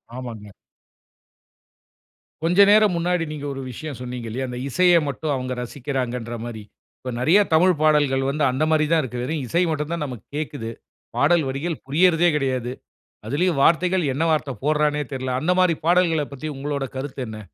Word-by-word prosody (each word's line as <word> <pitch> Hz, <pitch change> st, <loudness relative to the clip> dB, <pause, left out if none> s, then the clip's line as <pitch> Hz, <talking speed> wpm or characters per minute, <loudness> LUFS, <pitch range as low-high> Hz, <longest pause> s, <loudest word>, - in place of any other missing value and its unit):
ஆமாங்க. 115 Hz, -5 st, -7 dB, 2.0 s
கொஞ்சம் 185 Hz, +5 st, +5 dB
நேரம் 210 Hz, -2 st, +5 dB
முன்னாடி 175 Hz, 0 st, 0 dB
நீங்க 150 Hz, -1 st, -6 dB
ஒரு 135 Hz, -, -6 dB
விஷயம் 145 Hz, +2 st, -7 dB
சொன்னீங்க 125 Hz, -2 st, -6 dB
இல்லயா, 130 Hz, +4 st, -3 dB
அந்த 125 Hz, -, -6 dB
இசையை 175 Hz, +4 st, +4 dB
மட்டும் 145 Hz, +2 st, -3 dB
அவங்க 130 Hz, 0 st, -3 dB
ரசிக்கிறாங்ன்ற 125 Hz, -2 st, -4 dB
மாரி. 115 Hz, -3 st, -7 dB, 0.4 s
இப்போ 125 Hz, -, -5 dB
நிறைய 160 Hz, +11 st, +5 dB
தமிழ் 180 Hz, +3 st, +5 dB
பாடல்கள் 145 Hz, -4 st, +3 dB
வந்து 150 Hz, +2 st, -1 dB
அந்த 130 Hz, +4 st, -1 dB
மாரி 155 Hz, -1 st, +3 dB
தான் 165 Hz, -1 st, +4 dB
இருக்கு. 125 Hz, -1 st, -5 dB
வெறும் 150 Hz, +2 st, -2 dB
இசை 170 Hz, +7 st, +1 dB
மட்டும் 150 Hz, 0 st, -2 dB
தான் 170 Hz, -3 st, -2 dB
நமக்கு 125 Hz, -7 st, -8 dB
கேட்குது. 145 Hz, -7 st, -4 dB, 0.5 s
பாடல் 170 Hz, -2 st, +4 dB
வரிகள் 150 Hz, +4 st, -3 dB
புரியறதே 170 Hz, +4 st, +4 dB
கிடையாது. 130 Hz, -4 st, -1 dB, 0.6 s
அதிலயும் 155 Hz, +4 st, +1 dB
வார்த்தைகள் 180 Hz, +2 st, +3 dB
என்ன 145 Hz, +5 st, -1 dB
வார்த்தை 150 Hz, -3 st, 0 dB
போடுறான்னே 150 Hz, -1 st, +1 dB
தெரியல. 130 Hz, -1 st, -2 dB
அந்த 175 Hz, -, +1 dB
மாரி 180 Hz, -2 st, +4 dB
பாடல்களைப் 165 Hz, -4 st, +2 dB
பத்தி 140 Hz, +3 st, -6 dB
உங்களோட 140 Hz, 0 st, -3 dB
கருத்து 135 Hz, 0 st, -5 dB
என்ன? 110 Hz, -1 st, -7 dB
145 Hz, 160 wpm, -22 LUFS, 130-165 Hz, 2.0 s, கொஞ்சம்